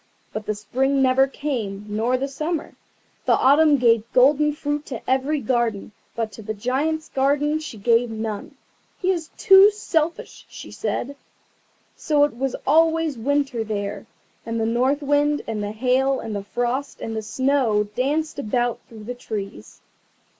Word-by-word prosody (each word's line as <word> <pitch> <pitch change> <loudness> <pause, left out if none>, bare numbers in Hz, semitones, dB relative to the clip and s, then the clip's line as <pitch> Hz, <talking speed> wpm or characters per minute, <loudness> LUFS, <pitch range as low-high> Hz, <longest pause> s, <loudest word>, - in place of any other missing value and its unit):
But 215 -1 -5
the 215 - -1
Spring 265 +7 0
never 265 +1 +4
came, 230 -9 -4
nor 225 +5 0
the 270 +2 -2
Summer. 305 +4 -4 0.5
The - - +5
Autumn 290 +2 +5
gave 230 -2 +2
golden 295 +4 +4
fruit 290 0 -3
to 240 -5 -7
every 265 +4 +1
garden, 235 -4 -1 0.2
but 225 -2 -2
to 220 - -10
the 215 +1 -5
Giant's 290 +8 -1
garden 290 +3 +1
she 310 -8 -8
gave 230 +3 +2
none. 220 -2 -5 0.4
"He 375 0 +1
is 335 -4 -3
too 390 -1 +8
selfish," 335 -6 -3
she - - -10
said. 280 +3 -3 0.8
So 295 -2 +2
it 290 -5 +1
was 265 +1 -2
always 325 0 +3
Winter 270 0 0
there, 205 0 -4 0.4
and 230 0 -3
the 220 - 0
North 255 +6 +1
Wind, 290 +1 +1
and 220 -2 -3
the 205 0 -3
Hail, 260 +4 +1
and 225 -2 -5
the 200 -1 -5
Frost, 245 +5 -2
and 225 - -5
the 220 - -2
Snow 235 -1 +1
danced 280 +9 -2
about 240 0 -1
through 220 -2 -11
the 245 +4 -5
trees. 200 - -7
255 Hz, 160 wpm, -23 LUFS, 225-290 Hz, 0.8 s, too